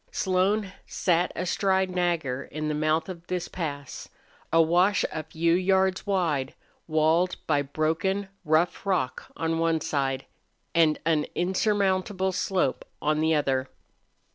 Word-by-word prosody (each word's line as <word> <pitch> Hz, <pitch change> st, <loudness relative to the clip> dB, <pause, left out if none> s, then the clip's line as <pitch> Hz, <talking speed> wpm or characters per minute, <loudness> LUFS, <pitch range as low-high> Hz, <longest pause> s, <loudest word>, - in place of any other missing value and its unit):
Slone 190 Hz, +1 st, +1 dB
sat 175 Hz, 0 st, +1 dB
astride 190 Hz, +1 st, +1 dB
Nagger 170 Hz, -8 st, -1 dB
in 155 Hz, 0 st, -4 dB
the -, -, 0 dB
mouth 155 Hz, +1 st, +1 dB
of 175 Hz, -2 st, -8 dB
this 180 Hz, -1 st, -2 dB
pass 145 Hz, -5 st, -6 dB, 0.4 s
a 165 Hz, -, +4 dB
wash 175 Hz, +5 st, +4 dB
a 160 Hz, -, -3 dB
few 165 Hz, +2 st, 0 dB
yards 190 Hz, +1 st, +2 dB
wide, 165 Hz, -9 st, 0 dB, 0.3 s
walled 160 Hz, +3 st, +2 dB
by 145 Hz, -2 st, +2 dB
broken, 165 Hz, +7 st, -1 dB, 0.2 s
rough 160 Hz, +2 st, +1 dB
rock 180 Hz, -10 st, -1 dB
on 165 Hz, 0 st, -1 dB
one 165 Hz, -1 st, +2 dB
side 135 Hz, -3 st, -1 dB, 0.5 s
and 160 Hz, -2 st, +4 dB
an 155 Hz, -2 st, +2 dB
insurmountable 190 Hz, 0 st, +1 dB
slope 185 Hz, -5 st, 0 dB, 0.2 s
on 155 Hz, 0 st, +1 dB
the 160 Hz, 0 st, +3 dB
other. 135 Hz, -3 st, 0 dB
165 Hz, 130 wpm, -26 LUFS, 155-185 Hz, 0.5 s, a